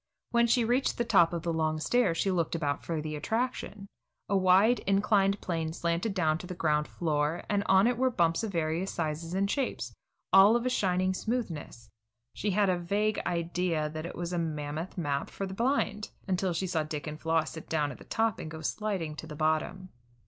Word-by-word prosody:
When 235 0 +4
she 235 0 +3
reached 245 +4 +1
the 235 - 0
top 170 -6 +5
of 170 -2 -3
the 170 - -1
long 155 -1 0
stairs, 190 -1 +2
she 195 - +1
looked 170 -2 0
about 145 -3 -1
for 165 -2 -2
the 155 -1 -4
attraction. 220 +3 -2 0.4
A 200 - +2
wide 190 +5 +5
inclined 200 0 +3
plane 165 -3 -2
slanted 170 +5 -1
down 160 -4 +2
to 180 - -8
the 180 - -6
ground 150 -3 +1
floor, 155 0 -1
and 205 -1 +1
on 190 +2 +5
it 245 0 +1
were 260 0 +3
bumps 170 -4 +1
of 220 - -2
various 165 +2 -1
sizes 165 +1 -3
and 195 +1 +2
shapes, 265 +4 -2 0.4
all 195 +4 +8
of 240 +1 0
a 255 - +1
shining 185 -4 +1
smoothness. 170 - -4 0.4
She 210 - -2
had 205 +1 +3
a 180 -2 +1
vague 205 +5 0
idea 170 -2 -1
that 155 +1 -5
it - - -8
was 175 +1 -4
a 175 - 0
mammoth 155 +1 -4
map 145 -5 -1
for 195 - -4
the 190 - -6
blind, 225 -2 0 0.2
until 185 -1 0
she 170 +3 -1
saw 175 -3 0
Dick 155 -1 -5
and 150 0 -6
Floss 160 -1 +1
sit 160 - -9
down 150 -3 0
at - - -11
the - - -11
top 225 -2 0
and 155 - -6
go 160 0 -8
sliding 185 -4 -2
to 160 - -7
the 150 - -8
bottom. 155 +4 -1
175 Hz, 210 wpm, -29 LUFS, 160-200 Hz, 0.4 s, all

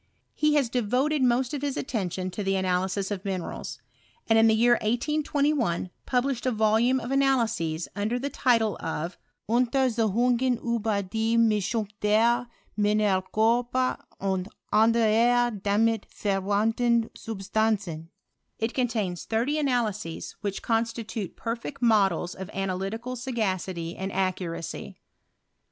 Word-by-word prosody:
He 300 0 +2
has 280 -4 +3
devoted 250 +6 0
most 250 +1 +2
of 285 - -3
hU 285 -1 -1
attention 185 -7 -3
to 200 +3 -4
the 195 0 +1
analysis 190 +1 0
of 195 -2 -3
minerals; 190 -4 -4 0.5
and 225 0 +5
in 225 - +6
the 220 - +4
year 235 +2 +4
1821 280 - 0 0.2
published 255 0 0
avoluroe 225 +2 +3
of 245 +1 -6
analyses 230 -12 +1
under 215 +4 -1
the 280 +3 -3
title 225 -6 +2
of 165 +2 -4
" - - -55
Untersuchun 240 -1 +2
gen 255 0 +1
iiber 220 -4 -1
die 225 +3 0
Mischung 220 -1 +2
der 230 +3 +3 0.3
Mineralkorper 215 +5 +1 0.2
and 190 0 -1 0.2
anderer 230 +1 +3
damit 215 +2 +1
verwandten 220 +4 +1
Subatanzen." 200 -5 -2 0.5
It 225 +1 -2
contains 220 -8 -1
thirty 245 +7 0
analyses, 220 - -1
which 200 -1 -3
constitute 225 -3 -2
perfect 235 +4 -4
models 195 -7 +2
of' 190 +1 -8
analytical 195 +6 -3
sao^city 190 -9 -2
and 190 +1 -4
accuracy. 180 -3 -3
220 Hz, 120 wpm, -26 LUFS, 195-245 Hz, 0.5 s, in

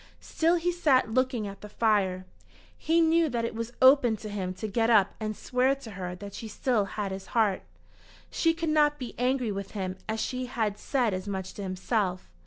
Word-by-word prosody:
Still 335 +2 +1
he 350 +1 0
sat 280 -10 +2
looking 255 -3 +1
at 195 0 -9
the 210 - -9
fire. 200 -4 +1 0.5
He 330 +1 +2
knew 325 0 +3
that 235 -2 -1
it 230 - -3
was 230 +1 -5
open 260 -4 +6
to 215 +1 -8
him 190 -3 -3
to 200 +4 -4
get 225 +2 +1
up 205 -4 +4
and 215 -1 -3
swear 255 +2 +1
to 270 -5 -11
her 180 -2 -5
that 200 +2 -9
she 225 - -7
still 220 0 0
had 200 0 -4
his 190 0 -6
heart. 210 -4 +3 0.7
She 330 -1 +2
could 330 -1 -2
not 295 -1 +3
be 250 -4 -6
angry 250 -2 +1
with 195 0 -6
him 185 -1 -3
as 220 0 -1
she 255 +2 -2
had 220 -4 -2
said 245 -7 0
as 185 +2 -4
much 190 -2 -4
to - - -8
himself. 185 - -2
225 Hz, 205 wpm, -28 LUFS, 200-260 Hz, 0.7 s, open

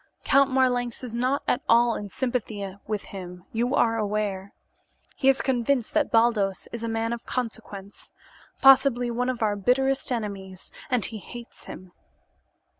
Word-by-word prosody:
Count 275 -1 +4
Marlanx 250 -2 0
is 245 -3 -6
not 255 +4 0
at - - +1
all 235 0 +5
in 205 -2 -5
sympathy 215 -5 -3
with 210 -2 -2
him, 180 -2 -8
you 240 +4 0
are 225 -3 +2
aware. 205 -2 -2 0.6
He 270 - +3
is 270 - +3
convinced 250 -1 0
that - - +2
Baldos 225 -4 +2
is 235 -1 -6
a 230 - -2
man 225 +1 -1
of 235 - -8
consequence, 215 -5 -6 0.5
possibly 260 -3 +6
one 250 +2 -1
of 245 -3 -2
our 210 -1 +1
bitterest 265 +6 +1
enemies, 195 -5 -5 0.2
and 250 -5 +2
he 220 -2 -6
hates 240 +4 -11
him. 185 -1 -10
230 Hz, 155 wpm, -25 LUFS, 205-250 Hz, 0.6 s, possibly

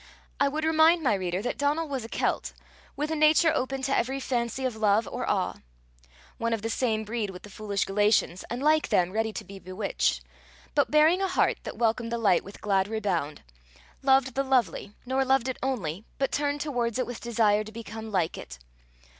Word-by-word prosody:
I 280 - +4
would 305 +3 -2
remind 320 +1 +4
my 255 - +3
reader 185 0 -2
that 245 - -3
Donal 295 +3 +1
was 270 -4 -3
a 225 - -8
Celt, - - -1 0.4
with 300 +2 -2
a - - 0
nature 310 +2 +5
open 270 -2 -2
to 275 0 +1
every 265 +3 0
fancy 250 0 -2
of 250 -3 -1
love 215 0 +2
or - - -4
awe - - 0 0.8
one 230 0 0
of 220 -2 -3
the 225 - -1
same 220 -3 0
breed 215 -1 -3
with 180 -1 -10
the 205 - -11
foolish 205 -1 -2
Galatians, 205 -3 +2
and 245 +3 -4
like 310 +1 +3
them 180 0 +2
ready 220 +2 0
to - - -6
be 195 0 -11
bewitched; 190 +2 -1 0.5
but 285 -2 +2
bearing 310 +5 +4
a 385 - +2
heart 365 - +1
that - - -6
welcomed 230 0 0
the 235 - 0
light 205 -6 +3
with 200 - -12
glad 195 -2 +1
rebound 190 -9 -2 0.6
loved 265 -1 +3
the 275 - +1
lovely, 240 -7 0
nor 260 +2 +1
loved 265 -1 +2
it 260 - -3
only, 210 - -2
but 270 - 0
turned 290 0 -1
towards 245 -6 -1
it 255 - 0
with 245 -2 -7
desire 215 -3 +2
to 215 - -10
become 220 -1 -8
like 180 -4 0
it. 65 0 -9
235 Hz, 205 wpm, -27 LUFS, 210-270 Hz, 0.8 s, nature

